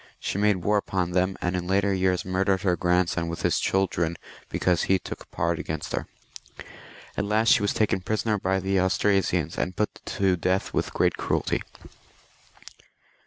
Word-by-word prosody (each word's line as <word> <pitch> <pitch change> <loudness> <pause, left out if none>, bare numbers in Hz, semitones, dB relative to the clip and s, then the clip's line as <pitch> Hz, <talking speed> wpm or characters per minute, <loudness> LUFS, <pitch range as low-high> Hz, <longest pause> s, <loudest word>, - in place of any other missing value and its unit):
She 100 - -3
made 105 -4 +2
war 105 0 +3
upon 95 -3 -1
them, 95 +1 +1
and 90 +1 0
in 90 -1 -3
later 100 +1 +2
years 95 -1 +1
murdered 95 0 +1
her 90 -3 +2
grandson 90 -1 +1
with 85 0 -5
his - - +2
children 85 -3 0 0.3
because 90 -2 +1
he 95 - +5
took - - -9
part 85 0 -1
against 80 -1 -4
her. - - -2 1.1
At - - -1
last 110 +2 +2
she - - +3
was 100 - +1
taken 105 -3 +1
prisoner 110 +2 0
by 95 0 0
the 95 +1 +1
Austrasians, 95 -4 +1
and 90 - -2
put 105 - -2
to 95 -2 +3
death 90 +2 -1
with - - -1
great - - +1
cruelty. - - 0
95 Hz, 165 wpm, -26 LUFS, 90-100 Hz, 1.1 s, he